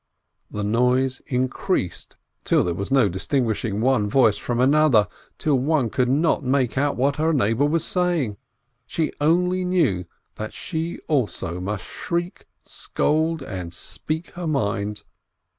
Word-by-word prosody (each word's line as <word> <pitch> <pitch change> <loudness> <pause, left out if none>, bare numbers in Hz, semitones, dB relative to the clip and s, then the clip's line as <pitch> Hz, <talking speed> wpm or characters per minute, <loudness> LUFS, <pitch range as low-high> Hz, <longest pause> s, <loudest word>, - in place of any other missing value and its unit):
The 105 - -4
noise 125 +4 +2
increased, 125 - -2 0.3
till - - +3
there 90 - -1
was 100 +3 -4
no 135 -5 +5
distinguishing 110 +1 -1
one 120 -5 +2
voice 115 -3 +4
from 120 -1 -2
another, 135 -5 +4 0.3
till 145 -4 +1
one 135 -4 +1
could 125 -1 +1
not 155 +5 +2
make 130 -2 +1
out 140 +1 +1
what 140 +3 +1
her 160 +2 +2
neighbor 120 -1 +2
was 165 +1 +1
saying: 170 - 0 0.5
she 160 -2 -1
only 180 +4 +2
knew 155 - +1 0.3
that - - -5
she 165 +1 -4
also 105 - -1
must 95 +1 -4
shriek, 175 - -4 0.2
scold, 160 0 -1
and 90 -7 -6
speak 160 +2 -5
her 175 -1 -5
mind. 105 -7 -1
130 Hz, 140 wpm, -23 LUFS, 105-155 Hz, 0.5 s, no